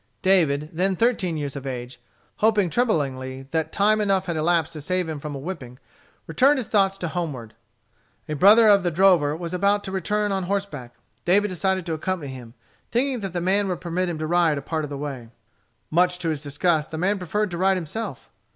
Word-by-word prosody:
David, 155 -6 +2
then 185 +3 +1
thirteen 190 -6 +1
years 145 -2 -4
of 140 -1 -6
age, 125 -1 -6 0.4
hoping 210 -5 +2
tremblingly 135 - -1
that 160 -1 -1
time 215 +2 +3
enough 195 -2 +1
had 170 - -2
elapsed 165 0 +1
to 155 - -7
save 185 +3 -1
him 155 -2 -4
from 145 0 -6
a - - -4
whipping, 135 -5 -7 0.6
turned 275 - +5
his 255 - -3
thoughts 195 -2 +2
homeward. 155 -10 -4 0.7
A 155 - -3
brother 210 +8 +6
of 200 -1 +6
the 175 - 0
drover 170 -4 +3
was 170 0 -6
about 200 +3 +2
to 190 - -6
return 205 +2 -1
on 190 -2 -1
horseback. 175 -11 -4 0.3
David 205 +4 +3
decided 185 0 -1
to 165 - -2
accompany 160 -3 -3
him, 120 -2 -11 0.3
thinking 255 +1 0
that 195 -4 -5
the 175 - -2
man 195 +3 +2
would 180 -2 -2
permit 180 +1 -2
him 170 - -3
to 155 - -3
ride 165 -2 +2
a - - -3
part 160 +1 -2
of 150 - -5
the 140 - -5
way. 135 -5 -6 0.6
Much 180 +2 +3
to 175 -2 -2
his 155 -3 -2
disgust, 150 +2 0
the 160 - -6
man 195 +4 0
preferred 205 +3 -2
to 170 - -4
ride 190 0 +3
himself. 180 - -6
175 Hz, 205 wpm, -23 LUFS, 150-195 Hz, 0.7 s, brother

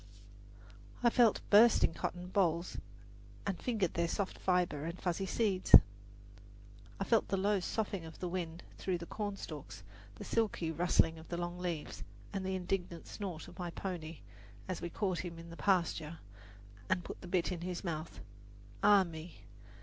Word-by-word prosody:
I 235 - +6
felt 235 -3 +5
the - - -6
bursting 215 -4 +7
cotton 180 +2 -4
bolls 175 -3 +1 0.7
and 195 -3 -2
fingered 215 -8 0
their 170 0 +1
soft 190 +3 -2
fiber 180 -5 +1
and 170 +3 -4
fuzzy 185 +2 -1
seeds; 195 -3 +5 1.2
I - - +1
felt 225 +2 +3
the 195 - 0
low 200 +1 +2
soughing 195 -1 -2
of 160 -1 -10
the 180 - -3
wind 175 -1 -4 0.2
through 185 -2 0
the 170 - -7
cornstalks, 195 - -6 0.3
the - - -8
silky 210 -7 0
rustling 165 -1 +3
of 160 - -13
the 170 - -3
long 175 0 -3
leaves, 175 -4 -4 0.3
and 195 -1 -2
the 190 0 -1
indignant 180 -2 -3
snort 185 -6 -6
of 175 +1 -13
my 175 -1 -3
pony, 170 -3 -5 0.5
as 185 -2 -3
we 175 - -3
caught 185 -1 -1
him 170 -2 -5
in 165 0 -10
the - - -8
pasture 170 -4 +1 0.7
and 185 -1 +1
put - - -8
the 180 - -8
bit 180 0 +1
in 175 -2 -4
his 180 0 -4
mouth 160 -3 -4 0.6
ah 205 -1 +7
me! 165 -1 -9
180 Hz, 165 wpm, -34 LUFS, 170-195 Hz, 1.2 s, bursting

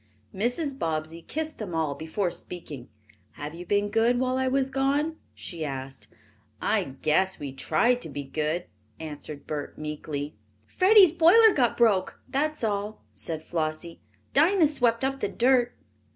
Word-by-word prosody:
Mrs. 265 - -1
Bobbsey 160 +1 -3
kissed 315 - -5
them 190 -6 -5
all 160 -3 0
before 160 +5 -2
speaking. 150 -10 -8 0.4
"Have 150 +1 -7
you 175 +1 -9
been 205 0 +1
good 230 +3 +3
while 255 0 0
I 260 0 0
was 270 0 +1
gone?" 285 +4 0 0.2
she 165 -3 -6
asked. 135 -2 -6 0.5
"I - - +1 0.2
guess 190 +5 +2
we 140 -2 -6
tried 235 - +1
to - - -4
be 145 - -5
good," 155 +5 -2 0.3
answered 150 -2 -7
Bert 150 -1 -5
meekly. 150 -1 -5 0.3
"Freddie's 380 - +6
boiler 365 +7 +6
got 245 -4 +1
broke, 210 -6 +2
that's 305 0 -1
all," 210 - -2
said 155 - -5
Flossie. 160 0 -3 0.3
"Dinah 335 +4 +5
swept 245 -5 +2
up 270 0 -2
the - - -1
dirt." 245 0 +2
205 Hz, 150 wpm, -26 LUFS, -, 0.5 s, Freddie's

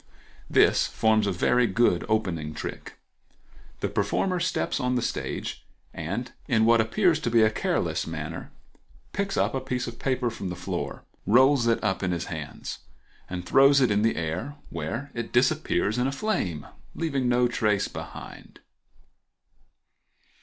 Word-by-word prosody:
—This - - +4
forms 110 -1 +2
a - - +1
very 120 +7 +2
good 100 -4 +2
opening 85 -8 -1
trick. - - -7 0.8
The - - +1
performer 185 -2 0
steps 170 - -1
on 125 0 0
the 125 - +1
stage - - -4 0.3
and, - - -4 0.2
in 110 0 +3
what 115 0 +5
appears 170 - +2
to 120 - -1
be 115 -1 +5
a 110 - +4
careless - - -1
manner, 80 0 -6 0.6
picks 200 0 -2
up - - +2
a 135 - 0
piece 125 -1 -2
of 120 0 -8
paper 125 -3 0
from 100 -4 -5
the 90 - -4
floor, 90 - -4 0.2
rolls 130 +2 +5
it 115 -1 +2
up 95 -3 0
in 90 - 0
his 85 - -3
hands, - - -6 0.5
and 90 -1 -5
throws 135 +6 +6
it 125 -5 +3
in 105 0 +2
the 115 +1 +2
air, 85 - -3 0.2
where 110 - -4
it 120 -1 -5
disappears 125 -3 +2
in 125 - +2
a - - -1
flame, 140 - -2 0.3
leaving 140 -6 0
no 125 0 +3
trace 105 -4 +1
behind. - - -9
115 Hz, 155 wpm, -26 LUFS, 100-135 Hz, 0.8 s, throws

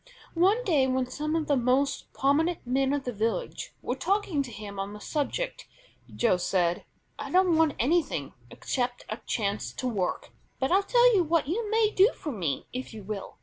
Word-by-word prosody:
One 390 +8 +3
day 300 - +3
when 260 0 +1
some 305 +5 -3
of 320 -2 0
the 290 - +2
most 255 +2 +1
prominent 310 +5 +1
men 265 +2 +1
of 285 -1 -1
the 250 - -4
village 225 - -2
were - - -1
talking 390 -7 0
to 260 -3 -6
him 205 -3 -8
on 195 +1 -4
the 210 - -9
subject - - -3 0.5
Joe 225 -6 +3
said: 175 -1 0 0.3
"I - - -5
don't 365 -2 +4
want 320 -2 +3
anything 275 - 0 0.2
except 245 - -3
a 215 - -3
chance 205 -2 -1
to 255 - -3
work, 200 -7 -2 0.3
but 265 +3 -1
I'll 385 +2 +5
tell 485 +4 +5
you 370 - +4
what 330 -2 +1
you 420 +7 -2
may 435 -1 +3
do 395 +5 +5
for 300 - -5
me 170 - -2
if 250 -2 -6
you 215 - -8
will. 200 0 -6
275 Hz, 190 wpm, -28 LUFS, 225-350 Hz, 0.5 s, I'll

